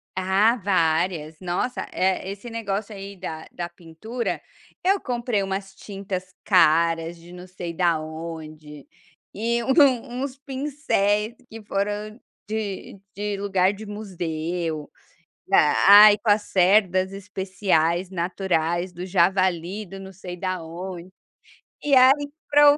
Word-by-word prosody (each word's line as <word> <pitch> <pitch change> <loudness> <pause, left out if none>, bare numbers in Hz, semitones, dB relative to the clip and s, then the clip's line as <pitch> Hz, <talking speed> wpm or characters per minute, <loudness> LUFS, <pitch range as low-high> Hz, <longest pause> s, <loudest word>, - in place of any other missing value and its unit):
Ah, 190 +5 +3
várias. 165 -4 0
Nossa, 185 +8 -2
eh, 190 0 0
esse 200 +4 -7
negócio 215 -2 -3
aí 195 0 -8
da 160 -3 -7
da 175 -1 -5
pintura, 175 +8 -5 0.4
eu 390 +2 +3
comprei 240 -4 -1
umas 195 0 -4
tintas 195 -2 -6
caras 165 -2 +3
de 170 +1 -14
não 180 +1 -10
sei 175 -2 -6
da 170 -2 +2
onde, 155 -2 -8 0.5
e 235 +3 -1
um 260 -3 +3
uns 270 -1 -5
pincéis, 260 -6 -1
que 220 -1 -10
foram 210 +3 -3 0.3
de 210 -2 -5 0.2
de 205 0 -3
lugar 195 -1 +1
de 215 +1 -10
museu, 170 -6 -4 0.6
ai, 205 +7 +8
com 215 0 -1
as 205 +1 +4
cerdas 190 -1 +3
especiais 190 -3 0
naturais 175 -1 -1
do 175 +1 -7
javali 185 +1 +1
do 195 0 -10
não 190 0 -10
sei 180 -1 -8
da 185 0 -3
onde, 175 +2 -7 0.7
e 285 -2 +3
aí 275 +3 +5 0.2
para 290 0 +7
o - - -2
190 Hz, 125 wpm, -24 LUFS, 175-210 Hz, 0.7 s, ai